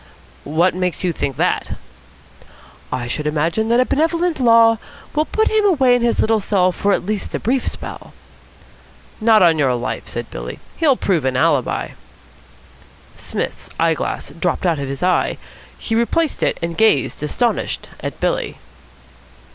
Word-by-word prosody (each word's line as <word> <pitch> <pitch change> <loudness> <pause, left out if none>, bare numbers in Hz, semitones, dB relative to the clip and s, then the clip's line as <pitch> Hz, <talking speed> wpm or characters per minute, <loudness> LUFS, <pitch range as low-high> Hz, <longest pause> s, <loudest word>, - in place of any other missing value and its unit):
"What 170 +5 +2
makes 180 +1 -2
you 180 -2 +1
think 140 -3 -3
that?" - - 0 1.2
"I 125 -1 -2
should 150 +5 -3
imagine 165 +9 0
that 235 +1 +4
a 255 - +4
benevolent 330 +3 0
Law 230 -2 +5 0.3
will 305 +1 +1
put 440 +7 0
him 435 -1 +3
away 275 -11 +4
in 245 - 0
his 235 0 +1
little 220 0 +2
cell 190 -2 +2
for 200 +3 0
at - - 0
least 210 0 -3
a - - -2
brief 255 +3 0
spell." - - -7 1.1
"Not 220 -3 +5
on 165 -3 +4
your 130 -3 +2
life," 120 - -4
said - - -6
Billy. - - -6 0.2
"He'll 285 -6 +3
prove 175 -7 0
an 130 -1 0
alibi." - - +1 1.3
Psmith's - - -4
eyeglass 160 -3 -1
dropped 170 +4 -2
out 165 -4 +1
of 140 -1 -4
his 140 +3 -5
eye. 185 0 +1 0.4
He 225 - -4
replaced 235 +8 +1
it, - - +1
and 170 0 -2
gazed, 165 - +2
astonished, 230 +11 -1
at - - -6
Billy. - - -1
200 Hz, 155 wpm, -19 LUFS, 160-245 Hz, 1.3 s, Law